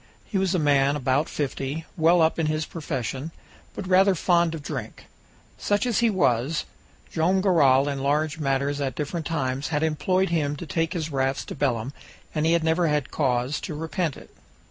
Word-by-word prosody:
He 200 Hz, -, -1 dB
was 190 Hz, -1 st, +1 dB
a -, -, +3 dB
man 140 Hz, -2 st, +3 dB
about 135 Hz, +2 st, 0 dB
fifty, 145 Hz, +2 st, -3 dB
well 165 Hz, +1 st, +4 dB
up 160 Hz, +1 st, +1 dB
in 160 Hz, -, +1 dB
his 155 Hz, 0 st, -1 dB
profession, 140 Hz, -3 st, -4 dB, 0.5 s
but 195 Hz, -, -5 dB
rather 190 Hz, +1 st, +5 dB
fond 170 Hz, -1 st, +2 dB
of 155 Hz, -, -8 dB
drink. -, -, -6 dB, 0.5 s
Such 205 Hz, +3 st, +1 dB
as 240 Hz, -4 st, +1 dB
he 235 Hz, -1 st, +3 dB
was, 150 Hz, -, +1 dB, 0.5 s
Joam 175 Hz, +4 st, +2 dB
Garral 145 Hz, -8 st, +4 dB
in 140 Hz, -1 st, -2 dB
large 150 Hz, +3 st, 0 dB
matters 140 Hz, 0 st, 0 dB
at 135 Hz, -3 st, -2 dB
different 155 Hz, +2 st, -3 dB
times 135 Hz, -4 st, -2 dB
had 150 Hz, -1 st, -1 dB
employed 185 Hz, +5 st, +1 dB
him 150 Hz, -4 st, 0 dB
to 160 Hz, -, -7 dB
take 165 Hz, +1 st, -1 dB
his 160 Hz, -2 st, -3 dB
rafts 135 Hz, -1 st, -1 dB
to -, -, -6 dB
Belem, 130 Hz, -2 st, -1 dB, 0.4 s
and 155 Hz, 0 st, +1 dB
he 165 Hz, -, +4 dB
had 170 Hz, -1 st, +2 dB
never 165 Hz, +1 st, +2 dB
had 150 Hz, -3 st, 0 dB
cause 130 Hz, 0 st, 0 dB
to 160 Hz, -, -5 dB
repent 160 Hz, 0 st, -2 dB
it. -, -, -14 dB
155 Hz, 190 wpm, -25 LUFS, 140-170 Hz, 0.5 s, rather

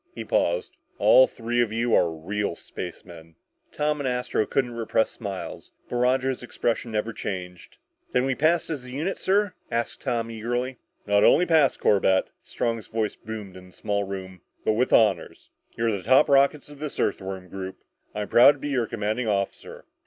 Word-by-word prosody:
He -, -, -6 dB
paused. -, -, 0 dB, 0.2 s
"All -, -, +6 dB
three 120 Hz, -, -1 dB
of 115 Hz, -3 st, 0 dB
you 115 Hz, +1 st, 0 dB
are 85 Hz, -, +4 dB
real 90 Hz, +4 st, -3 dB
spacemen!" 85 Hz, -2 st, -9 dB, 0.4 s
Tom 150 Hz, 0 st, -1 dB
and 135 Hz, -, -2 dB
Astro 125 Hz, -3 st, -1 dB
couldn't 130 Hz, -3 st, 0 dB
repress 115 Hz, -1 st, 0 dB
smiles, 100 Hz, -5 st, -7 dB
but 120 Hz, -, -3 dB
Roger's 130 Hz, +1 st, +1 dB
expression 120 Hz, -1 st, -2 dB
never 110 Hz, +1 st, -2 dB
changed. 90 Hz, -4 st, -6 dB, 0.3 s
"Then 125 Hz, +1 st, +2 dB
we 135 Hz, -, +1 dB
passed 160 Hz, +5 st, +1 dB
as 145 Hz, -5 st, -4 dB
a 125 Hz, -, -10 dB
unit, 155 Hz, +9 st, -3 dB
sir?" 200 Hz, 0 st, +1 dB, 0.2 s
asked 115 Hz, -1 st, -2 dB
Tom 115 Hz, -1 st, -2 dB
eagerly. 120 Hz, +3 st, -3 dB, 0.3 s
"Not 100 Hz, 0 st, +3 dB
only 180 Hz, -, +5 dB
passed, 160 Hz, -5 st, +3 dB
Corbett" 95 Hz, -2 st, +2 dB
Strong's 115 Hz, -2 st, -3 dB
voice 110 Hz, -1 st, -2 dB
boomed 105 Hz, -4 st, -8 dB
in 90 Hz, 0 st, -12 dB
the 90 Hz, -, -19 dB
small 100 Hz, 0 st, -1 dB
room 95 Hz, -2 st, -7 dB, 0.2 s
"but 110 Hz, -, +3 dB
with 125 Hz, +4 st, +1 dB
honors. 110 Hz, -2 st, +2 dB, 0.3 s
You're 115 Hz, 0 st, +1 dB
the 100 Hz, -3 st, -3 dB
top 130 Hz, +8 st, +5 dB
rockets 140 Hz, +1 st, +3 dB
of 145 Hz, -1 st, -13 dB
this 150 Hz, -1 st, -5 dB
Earthworm 95 Hz, -2 st, -2 dB
group! 95 Hz, 0 st, -7 dB, 0.3 s
I'm 105 Hz, -1 st, -3 dB
proud 125 Hz, +4 st, +7 dB
to -, -, -14 dB
be 145 Hz, +1 st, -5 dB
your 125 Hz, -5 st, 0 dB
commanding 110 Hz, +2 st, -2 dB
officer!" 100 Hz, -2 st, -3 dB
115 Hz, 175 wpm, -25 LUFS, 100-130 Hz, 0.4 s, proud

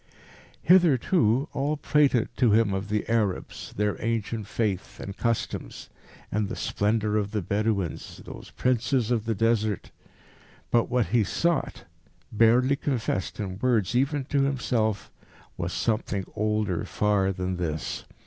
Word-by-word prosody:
Hitherto 155 Hz, -, +4 dB
all 145 Hz, +3 st, 0 dB
had 145 Hz, -, -15 dB
prated 140 Hz, -6 st, +3 dB
to 120 Hz, -5 st, +4 dB
him 110 Hz, -2 st, +3 dB
of 95 Hz, +2 st, -3 dB
the 105 Hz, 0 st, -1 dB
Arabs, 110 Hz, -5 st, -1 dB
their 105 Hz, 0 st, -1 dB
ancient 115 Hz, -1 st, -2 dB
faith 105 Hz, -4 st, -2 dB
and 100 Hz, -, -6 dB
customs, 115 Hz, -2 st, -3 dB, 0.4 s
and 105 Hz, -1 st, 0 dB
the 115 Hz, -, -4 dB
splendour 105 Hz, 0 st, 0 dB
of 105 Hz, -1 st, -1 dB
the 105 Hz, -2 st, -2 dB
Bedouins, 100 Hz, -4 st, -2 dB
those -, -, -10 dB
Princes 125 Hz, -1 st, 0 dB
of 115 Hz, -3 st, 0 dB
the 115 Hz, -1 st, 0 dB
Desert. 110 Hz, -1 st, 0 dB, 0.8 s
But 120 Hz, -1 st, +3 dB
what 120 Hz, -7 st, +1 dB
he 115 Hz, +1 st, +3 dB
sought, 170 Hz, -, -1 dB, 0.5 s
barely 120 Hz, +5 st, +4 dB
confessed 120 Hz, -10 st, -2 dB
in 95 Hz, -2 st, -4 dB
words 115 Hz, -4 st, +1 dB
even 135 Hz, +2 st, +1 dB
to 140 Hz, 0 st, +1 dB
himself, 120 Hz, -6 st, 0 dB, 0.4 s
was -, -, -3 dB
something 105 Hz, -3 st, -1 dB
older 105 Hz, -4 st, 0 dB
far 100 Hz, -2 st, +1 dB
than 90 Hz, -1 st, -3 dB
this. 80 Hz, -3 st, -3 dB
110 Hz, 140 wpm, -26 LUFS, 100-125 Hz, 0.8 s, Hitherto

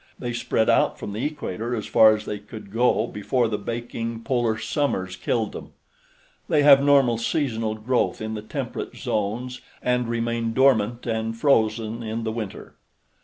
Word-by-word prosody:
They 120 Hz, -1 st, -4 dB
spread 110 Hz, -1 st, 0 dB
out -, -, +3 dB
from 100 Hz, -, -6 dB
the 110 Hz, -, -3 dB
equator 120 Hz, -6 st, -3 dB
as 110 Hz, -, -4 dB
far 110 Hz, -1 st, +6 dB
as 105 Hz, 0 st, -7 dB
they 105 Hz, -, -4 dB
could 105 Hz, -1 st, -11 dB
go 115 Hz, 0 st, +2 dB
before 120 Hz, +3 st, 0 dB
the 105 Hz, -1 st, -2 dB
baking 115 Hz, -1 st, -5 dB
polar 120 Hz, -4 st, 0 dB
summers 110 Hz, -5 st, -1 dB
killed 110 Hz, +3 st, -1 dB
them. -, -, -9 dB, 0.8 s
They 150 Hz, -2 st, +3 dB
have 140 Hz, -1 st, +8 dB
normal 135 Hz, -5 st, +4 dB
seasonal 115 Hz, -4 st, -1 dB
growth 120 Hz, +4 st, 0 dB
in 110 Hz, 0 st, -4 dB
the 105 Hz, -, -4 dB
temperate 110 Hz, -, -5 dB
zones 120 Hz, +5 st, -3 dB, 0.2 s
and 125 Hz, -1 st, 0 dB
remain 115 Hz, -1 st, -1 dB
dormant 120 Hz, -3 st, +3 dB
and 115 Hz, -1 st, -2 dB
frozen 115 Hz, -3 st, +1 dB
in 115 Hz, 0 st, -4 dB
the 110 Hz, -, -2 dB
winter. 110 Hz, -3 st, -6 dB
115 Hz, 165 wpm, -24 LUFS, 110-125 Hz, 0.8 s, have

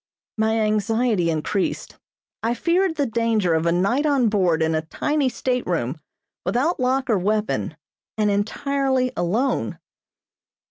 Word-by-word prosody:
My 220 Hz, +1 st, +2 dB
anxiety 215 Hz, -2 st, +1 dB
increased. 165 Hz, +5 st, -2 dB, 0.4 s
I 230 Hz, +2 st, 0 dB
feared 345 Hz, +6 st, +1 dB
the 285 Hz, -, +1 dB
danger 225 Hz, -6 st, +1 dB
of 160 Hz, +1 st, +1 dB
a -, -, +3 dB
night 200 Hz, -, +1 dB
on 270 Hz, -6 st, +3 dB
board 180 Hz, -6 st, +2 dB
in 160 Hz, 0 st, +1 dB
a 155 Hz, -, +1 dB
tiny 285 Hz, -, -1 dB
stateroom, 175 Hz, -, -2 dB, 0.4 s
without 255 Hz, -, 0 dB
lock 260 Hz, +1 st, +1 dB
or 220 Hz, -6 st, +2 dB
weapon, 210 Hz, -5 st, -1 dB, 0.4 s
and 210 Hz, -1 st, +2 dB
entirely 260 Hz, +5 st, 0 dB
alone. 220 Hz, +11 st, 0 dB
220 Hz, 130 wpm, -22 LUFS, 180-260 Hz, 0.4 s, a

